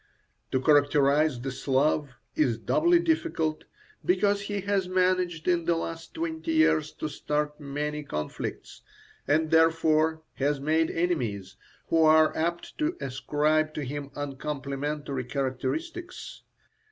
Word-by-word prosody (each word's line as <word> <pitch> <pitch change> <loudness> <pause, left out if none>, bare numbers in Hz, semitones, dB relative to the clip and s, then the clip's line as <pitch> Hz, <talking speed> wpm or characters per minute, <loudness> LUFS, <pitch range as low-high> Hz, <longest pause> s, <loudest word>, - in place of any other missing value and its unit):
To 130 - +2
characterize 145 0 +3
the 135 +2 -4
Slav 140 +3 +1 0.3
is 125 -7 +2
doubly 335 - +3
difficult, 320 - 0 0.4
because 205 - +2
he 200 0 -3
has 195 -1 0
managed 185 -3 +1
in 175 -2 +2
the 170 0 +2
last 165 0 -5
twenty 325 0 -3
years 155 - +3
to - - -4
start 150 0 -2
many 150 +1 -3
conflicts, 75 - -5 0.5
and 155 +2 +2
therefore 160 -1 +3
has 140 +1 0
made 160 +3 +1
enemies, 125 - -2 0.3
who 165 - +3
are 155 0 +5
apt 170 +2 -3
to 315 +4 0
ascribe 150 +3 0
to 150 - -3
him 140 +1 -5
uncomplimentary 145 -1 -4
characteristics. 315 - -4
155 Hz, 120 wpm, -27 LUFS, 145-175 Hz, 0.5 s, are